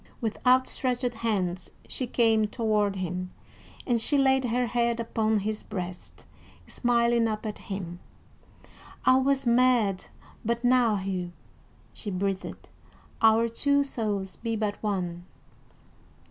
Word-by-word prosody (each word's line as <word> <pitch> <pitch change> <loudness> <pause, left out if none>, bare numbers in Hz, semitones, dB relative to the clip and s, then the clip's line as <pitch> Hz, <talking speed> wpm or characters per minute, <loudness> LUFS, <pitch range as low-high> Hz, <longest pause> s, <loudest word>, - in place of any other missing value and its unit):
With 225 -3 -3
outstretched 255 -1 +2
hands 190 -6 -2 0.2
she 255 - -2
came 225 -3 +3
toward 210 -3 0
him, 180 0 -3 0.6
and 235 -3 +2
she 285 +5 +3
laid 265 -1 +3
her 245 +1 +1
head 235 0 0
upon 220 -1 0
his 215 +1 -3
breast, 180 -3 -7 0.4
smiling 235 -1 +2
up 215 0 -3
at 215 - -5
him. 180 -3 -6 1.1
"I 255 - +6
was 270 0 +2
mad 235 -5 +3 0.4
but 235 +2 -1
now, 245 -3 +4
Hugh," 185 -2 -3 0.6
she 210 - -6
breathed. 195 0 -3 0.5
"Our 225 +1 +5
two 280 +5 +2
souls 205 -8 -3
be 225 -1 -3
but 210 -1 -2
one." 180 -5 -2
225 Hz, 120 wpm, -27 LUFS, 195-245 Hz, 1.1 s, I